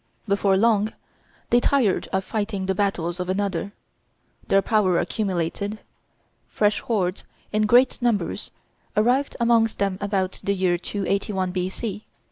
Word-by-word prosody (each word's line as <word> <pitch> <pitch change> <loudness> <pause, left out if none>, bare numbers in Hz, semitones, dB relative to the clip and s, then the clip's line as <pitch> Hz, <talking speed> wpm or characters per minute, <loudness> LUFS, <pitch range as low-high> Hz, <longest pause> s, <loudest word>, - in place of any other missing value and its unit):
Before 200 -1 +2
long 215 0 +2 0.6
they 240 - +6
tired 245 -6 +1
of 190 0 -1
fighting 205 -3 -2
the 190 - +1
battles 180 -3 -1
of 180 0 -3
another; 195 -1 -1 0.8
their 195 0 +3
power 205 -6 +2
accumulated; 200 +1 -2 0.7
fresh 210 -1 +1
hordes, 190 -5 -1 0.3
in 215 0 +2
great 245 +3 +4
numbers, 215 -8 0 0.5
arrived 250 +6 +2
amongst 230 -1 +3
them 195 -1 -1
about 195 -2 -1
the 200 - 0
year 180 -2 +1
281 195 0 -2
B.C. 190 +3 -4
200 Hz, 125 wpm, -24 LUFS, 185-215 Hz, 0.8 s, they